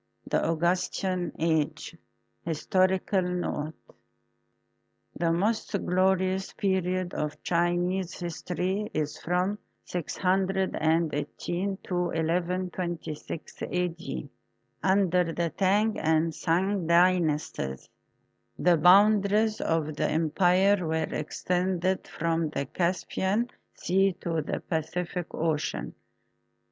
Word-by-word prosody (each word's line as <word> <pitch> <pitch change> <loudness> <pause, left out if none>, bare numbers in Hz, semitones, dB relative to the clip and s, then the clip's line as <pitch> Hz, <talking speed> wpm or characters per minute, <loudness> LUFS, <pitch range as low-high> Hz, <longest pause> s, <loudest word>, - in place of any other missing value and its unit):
IV - - -13
THE - - +2
AUGUSTAN 180 +1 0
AGE 160 0 0 0.5
HISTORICAL 185 +4 +1
NOTE 175 -4 -4 1.2
The 165 +1 +1
most 210 +8 0
glorious 190 +1 +1
period 185 -2 0
of 150 -1 -4
Chinese 175 +2 0
history 180 +4 -2
is 150 -1 -2
from 180 +4 0 0.3
6i8 180 -1 -1
to 180 - -4
1 170 0 0
1 185 0 -2
26 170 -3 -5
A.D. 170 - -3 0.5
under 185 -3 +2
the 170 -1 -1
Tang 205 +3 +2
and 160 +1 +2
Sung 180 +3 0
Dynasties. 170 - +2 0.7
The 175 -1 +4
bounda 200 +4 +6
ries 215 +1 +2
of 155 -2 0
the - - +1
empire 180 +5 +3
were 160 0 -1
extended 180 +4 -1
from 165 -1 -1
the 140 -2 -3
Caspian 190 - -1 0.2
Sea 195 +2 +2
to 165 -2 -1
the 150 - -3
Pacific 175 +1 -3
Ocean. 155 -2 -1
180 Hz, 95 wpm, -28 LUFS, 165-190 Hz, 1.2 s, bounda